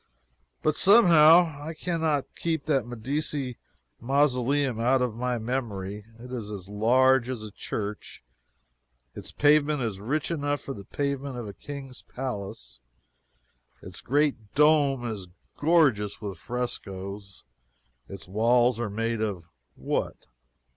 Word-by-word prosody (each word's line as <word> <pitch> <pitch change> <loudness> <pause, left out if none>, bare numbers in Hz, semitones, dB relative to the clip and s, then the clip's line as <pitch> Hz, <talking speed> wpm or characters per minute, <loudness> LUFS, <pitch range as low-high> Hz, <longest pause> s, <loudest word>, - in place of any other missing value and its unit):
But 155 - +3
somehow, 165 -5 +6
I 160 +2 -6
can 170 0 -3
not 150 -4 +1
keep 160 -3 -2
that 135 -6 0
Medici 130 +2 -3 0.4
mausoleum 135 -1 +1
out 125 +3 +3
of 125 -3 -1
my 125 +2 -2
memory. 105 -4 -4
It 125 +2 -11
is 115 -4 -5
as 100 -3 -7
large 125 +5 +3
as 125 -4 -4
a 105 - -8
church; 105 - -6 0.9
its - - -8
pavement 150 -1 +3
is 105 -5 -3
rich 140 +10 -2
enough 145 -2 -1
for 135 - -6
the 100 -4 -10
pavement 140 0 -3
of 120 -3 -5
a 100 - -7
King's 135 +1 -9
palace; 120 -7 -6 1.0
its - - -7
great 140 -6 0
dome 145 -4 +4
is 105 -5 -5 0.3
gorgeous 145 -11 +2
with 100 -5 -6
frescoes; 100 -2 -6 0.7
its 100 -1 -9
walls 120 +4 +3
are 120 -3 -2
made 115 +2 -2
of 90 -6 -4 0.2
what? - - -3
125 Hz, 130 wpm, -27 LUFS, 105-145 Hz, 1.0 s, somehow